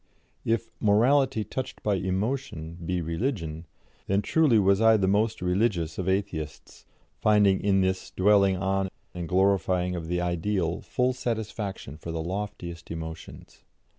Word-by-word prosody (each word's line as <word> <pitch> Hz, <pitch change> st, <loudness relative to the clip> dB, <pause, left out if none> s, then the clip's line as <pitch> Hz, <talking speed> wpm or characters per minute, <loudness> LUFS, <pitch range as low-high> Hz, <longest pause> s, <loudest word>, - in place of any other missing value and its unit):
If 115 Hz, 0 st, -1 dB
"morality 120 Hz, +3 st, +3 dB
touched 130 Hz, +5 st, -6 dB
by 105 Hz, -, +2 dB
emotion" 95 Hz, -, -2 dB
be 90 Hz, +1 st, -1 dB
religion, 85 Hz, -, -3 dB, 0.4 s
then 100 Hz, +1 st, +1 dB
truly 150 Hz, -5 st, +3 dB
was 100 Hz, 0 st, +3 dB
I 110 Hz, 0 st, +6 dB
the 95 Hz, -, +1 dB
most 105 Hz, +1 st, +1 dB
religious 90 Hz, -3 st, 0 dB
of 95 Hz, 0 st, -1 dB
Atheists, 85 Hz, -6 st, -4 dB, 0.3 s
finding 105 Hz, -3 st, +4 dB
in 95 Hz, -1 st, +3 dB
this 95 Hz, 0 st, -1 dB
dwelling 100 Hz, -1 st, +3 dB
on 95 Hz, 0 st, 0 dB, 0.2 s
and 85 Hz, -2 st, -5 dB
glorifying 95 Hz, -1 st, +2 dB
of 85 Hz, -2 st, -5 dB
the 90 Hz, +1 st, -1 dB
Ideal 90 Hz, 0 st, -1 dB
full 125 Hz, +1 st, 0 dB
satisfaction 110 Hz, -, -4 dB
for 85 Hz, -, -7 dB
the 80 Hz, -1 st, -3 dB
loftiest 90 Hz, -2 st, -5 dB
emotions. 80 Hz, -1 st, -8 dB
95 Hz, 135 wpm, -27 LUFS, 85-105 Hz, 0.4 s, I